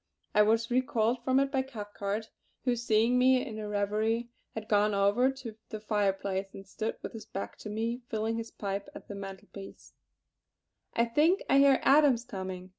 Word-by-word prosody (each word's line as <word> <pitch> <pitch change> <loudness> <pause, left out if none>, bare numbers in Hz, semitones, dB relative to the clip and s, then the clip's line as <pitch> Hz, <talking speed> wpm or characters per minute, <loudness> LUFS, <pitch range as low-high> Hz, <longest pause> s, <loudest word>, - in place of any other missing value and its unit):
I 210 - +6
was 225 +2 +2
recalled 245 -2 +1
from 260 +1 +3
it 275 0 +1
by 265 -2 +2
Cathcart, 210 -4 -5 0.3
who 250 -2 +2
seeing 230 +1 +2
me 255 +1 +4
in 220 -5 -6
a 210 - -4
reverie 215 +3 0 0.2
had 220 -1 -5
gone 210 0 +3
over 200 +6 +3
to 250 -5 -8
the 215 - -5
fireplace 195 -2 -1
and 195 - -9
stood 215 +3 -4
with - - -6
his 220 -1 -9
back 195 - -5
to 215 - -7
me, 230 +3 -2
filling 220 +1 -1
his 230 0 -5
pipe 200 0 -4
at - - -10
the - - -6
mantel 195 0 -8
piece: 195 -1 -11 1.0
"I 235 - +3
think 305 - +3
I 275 - +5
hear 275 -1 +6
Adams 275 -4 +5
coming. 185 -4 -6
220 Hz, 185 wpm, -30 LUFS, 205-245 Hz, 1.0 s, I